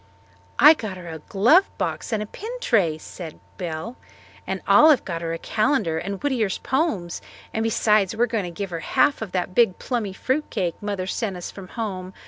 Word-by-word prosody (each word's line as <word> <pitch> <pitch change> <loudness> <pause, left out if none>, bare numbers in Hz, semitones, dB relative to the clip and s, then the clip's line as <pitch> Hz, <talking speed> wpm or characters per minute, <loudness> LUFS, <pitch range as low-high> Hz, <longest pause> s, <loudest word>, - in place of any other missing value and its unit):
"I 300 - +9
got 215 -10 -6
her 175 -1 -10
a 160 -1 -6
glove 240 - +4
box - - -3
and 215 -2 0
a - - -6
pin 420 - -8
tray," 200 - +2
said 160 0 -9 0.2
Belle, 170 +6 -5 0.5
"and - - -2
Olive 305 -3 +6
got 170 -3 -4
her 165 -1 -3
a 165 - -2
calendar 215 - 0
and 195 +3 -4
Whittier's 235 -9 0
poems. 260 - -1 0.3
And 220 - -1
besides 215 -3 +2
we 230 - +2
are - - +6
going 225 -5 -2
to - - -4
give 190 +2 -5
her 165 - -3
half 275 - +2
of 215 -4 -5
that 185 0 -1
big 210 -4 +3
plummy 225 -6 -2
fruit 265 +9 -1
cake 180 -6 -2
Mother 200 -3 -3
sent 195 0 -2
us 175 - -6
from 195 -2 -10
home. 190 -4 -5
200 Hz, 200 wpm, -23 LUFS, 180-235 Hz, 0.5 s, I